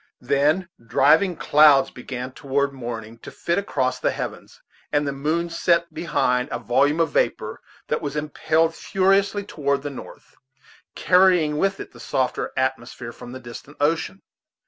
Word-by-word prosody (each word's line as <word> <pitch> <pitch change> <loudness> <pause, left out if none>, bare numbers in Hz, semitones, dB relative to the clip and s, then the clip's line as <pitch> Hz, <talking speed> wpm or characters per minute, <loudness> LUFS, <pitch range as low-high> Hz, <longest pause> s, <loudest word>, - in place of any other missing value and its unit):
Then 145 +8 +1 0.2
driving 160 - +3
clouds 145 -3 +5
began 125 0 -6
toward 140 +1 -1
morning 115 -3 -7
to - - -10
flit 170 +3 -1
across 130 -10 -1
the - - +1
heavens, - - -6 0.3
and 145 0 +1
the - - 0
moon 155 +5 -1
set 170 0 +1
behind 140 -6 0
a - - -1
volume 135 +7 +1
of 165 -3 +2
vapor - - -1 0.3
that - - -1
was 145 -1 -4
impelled 155 +2 0
furiously 195 +3 +1
toward 140 -6 -2
the 145 - -4
north, 135 - -12 0.6
carrying 180 -5 +3
with 195 +2 0
it - - -8
the 120 - -15
softer 130 +2 -2
atmosphere 130 -2 -2
from 120 - -11
the 130 - -8
distant 125 +4 -11
ocean. 165 +6 -1
145 Hz, 150 wpm, -23 LUFS, 130-165 Hz, 0.6 s, clouds